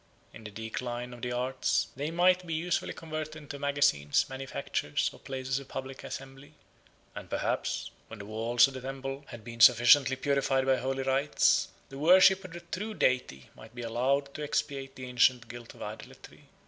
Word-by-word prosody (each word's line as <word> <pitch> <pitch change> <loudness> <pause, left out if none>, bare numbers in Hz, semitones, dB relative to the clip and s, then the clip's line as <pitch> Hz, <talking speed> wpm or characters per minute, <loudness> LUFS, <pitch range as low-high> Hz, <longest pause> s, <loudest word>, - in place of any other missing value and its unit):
In 110 - -12
the - - -6
decline 120 +3 -5
of 120 - -12
the 125 - -3
arts 125 +2 0
they 145 +4 -3
might 180 +2 +3
be 165 - -2
usefully 175 +2 -1
converted 155 -1 -6
into 145 -2 -9
magazines, 140 - +2
manufactures, 130 - -2
or - - -15
places 130 0 -3
of 140 - -12
public 135 0 -7
assembly: 135 +2 -9 0.6
and - - -9
perhaps, - - -2 0.2
when 115 - -10
the 100 - -9
walls 115 +4 +3
of 135 - -9
the 130 - -7
temple 135 +1 -6
had 120 -3 -10
been 115 0 -9
sufficiently 120 +3 +7
purified 135 -1 +1
by 130 -1 +3
holy 135 +2 -2
rites, 135 +2 +2 0.2
the 135 - -9
worship 185 +4 +6
of 185 -3 -10
the 175 - -8
true 205 +5 -5
Deity 125 - 0
might 110 +2 -14
be 120 - -6
allowed 135 +5 0
to 150 - -7
expiate 140 -2 -3
the 130 - -7
ancient 125 0 +2
guilt 120 0 -10
of - - -9
idolatry. - - -10
135 Hz, 180 wpm, -29 LUFS, 120-145 Hz, 0.6 s, sufficiently